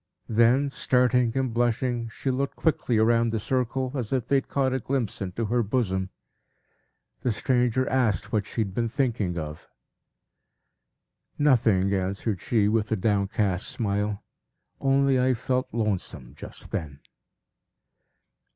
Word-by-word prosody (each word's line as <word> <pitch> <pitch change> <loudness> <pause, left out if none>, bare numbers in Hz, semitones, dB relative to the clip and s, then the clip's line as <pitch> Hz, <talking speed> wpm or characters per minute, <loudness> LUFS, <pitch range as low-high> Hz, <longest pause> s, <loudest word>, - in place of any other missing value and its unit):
Then 120 +5 +3
starting 125 -1 +2
and 130 -3 0
blushing, 120 0 0
she 130 +4 -3
looked 135 +2 -2
quickly 150 -7 +1
round 115 +1 +3
the 110 - -1
circle, 130 +2 -1
as 125 -6 -3
if 130 -4 0
they 140 - +3
had 135 - -2
caught 135 -2 0
a 130 - 0
glimpse 125 -4 -2
into 100 +4 -3
her 120 +3 +1
bosom. 95 -4 -1 1.1
The 125 - +1
stranger 125 +2 +1
asked 110 -6 +1
what 105 -3 0
she 115 - -2
had 100 -3 -2
been 115 +2 -1
thinking 110 -8 -1
of. 75 -1 -6 1.7
"Nothing," 110 -9 +3
answered 95 +1 -2
she, 110 -4 +2
with 110 0 0
a - - +3
downcast 100 -2 0
smile. 105 -5 -2 0.6
"Only 135 -1 +3
I 130 0 +3
felt 130 +2 -1
lonesome 100 - -3
just 75 - -10
then." 70 -3 -4
115 Hz, 135 wpm, -26 LUFS, 100-130 Hz, 1.7 s, Then